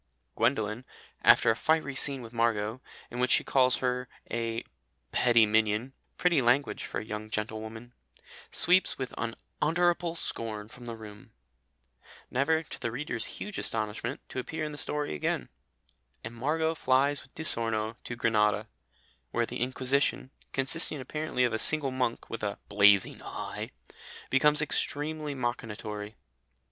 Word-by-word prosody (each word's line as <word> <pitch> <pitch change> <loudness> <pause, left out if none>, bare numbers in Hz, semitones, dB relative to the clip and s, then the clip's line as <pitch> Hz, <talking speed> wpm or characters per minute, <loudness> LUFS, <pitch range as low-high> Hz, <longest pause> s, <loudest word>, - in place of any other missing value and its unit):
Gwendolen, 115 -1 +1 0.4
after 115 - +6
a - - 0
fiery 155 +1 +1
scene 135 -1 +1
with 115 0 -10
Margot, 115 0 0 0.3
in 120 - -5
which 125 0 +2
she - - +5
calls 130 -2 +3
her 125 0 -1 0.2
a 115 -1 -2 0.5
"petty 120 -2 +5
minion," 110 +4 +1 0.2
pretty 175 -6 +3
language 125 +4 +2
for - - -4
a - - -7
young 110 0 -5
gentlewoman, 110 +2 -5 0.6
"sweeps 185 +2 +5
with 130 -1 -4
unutterable 170 +8 0
scorn 110 -8 -4
from 120 +1 -12
the 115 - -4
room," 105 -2 -12 1.0
never, 160 +5 +2
to - - -9
the 120 - -2
reader's 120 -1 -1
huge 210 -1 -5
astonishment, 110 +4 -1
to - - -4
appear 155 +5 -3
in 150 - -4
the 145 - -8
story 150 - -1
again, 70 -4 -2 0.7
and 110 - -6
Margot 160 +7 0
flies 140 -1 +2
with 130 - -19
Di 160 - -5
Sorno 115 -5 +2
to 120 - -5
Grenada, 105 -2 +2 0.6
where 120 - 0
the - - -6
Inquisition, 130 +1 0 0.2
consisting 145 +3 +1
apparently 135 0 -2
of 120 -2 +2
a 110 - 0
single 150 -1 +1
monk 125 -2 -1
with 115 - -6
a 105 -1 -2
"blazing 100 -1 +5
eye," - - -5 0.6
becomes 150 +3 +4
extremely 150 0 -1
machinatory. 110 -4 -4
120 Hz, 145 wpm, -29 LUFS, 110-140 Hz, 1.0 s, after